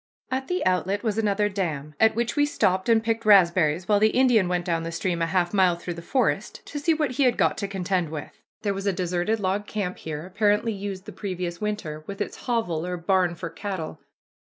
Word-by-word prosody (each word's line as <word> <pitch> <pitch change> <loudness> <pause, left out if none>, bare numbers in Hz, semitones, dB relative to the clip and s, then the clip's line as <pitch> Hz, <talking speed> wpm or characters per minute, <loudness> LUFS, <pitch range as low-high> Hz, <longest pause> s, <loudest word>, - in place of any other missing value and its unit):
At 265 +1 -2
the 360 0 -1
outlet 185 +3 +1
was 220 -2 0
another 210 -1 +2
dam, 160 -7 -3
at 220 -1 +5
which 235 0 -1
we 290 - +4
stopped 190 -7 +1
and 225 -1 +4
picked 225 0 -1
raspberries, 175 -5 +4
while 205 -1 +4
the 215 +1 +5
Indian 245 -7 +4
went 180 0 -1
down 165 -2 0
the 165 0 -4
stream 170 0 -2
a 165 - +2
half 175 +1 0
mile 185 -3 +4
through 175 +1 -5
the 170 - -8
forest, 255 +9 -1
to 290 - -5
see 300 +3 +2
what 305 -4 +1
he 265 +3 +1
had 245 -2 +3
got - - +2
to 200 - -2
contend 185 -3 -1
with. 155 -2 -6 0.3
There 200 -2 +1
was 195 +1 -4
a 200 - +2
deserted 180 +4 -1
log 200 +1 -1
camp 195 -4 -3
here, 155 0 -5
apparently 210 +3 +1
used 195 -1 -6
the - - -8
previous 180 -3 -4
winter, 205 -8 -3
with 200 0 -6
its 205 - -5
"hovel" 200 -10 0
or 180 0 -3
barn 175 0 +1
for 170 -1 -6
cattle. 190 -2 -5
195 Hz, 225 wpm, -25 LUFS, 175-215 Hz, 0.3 s, at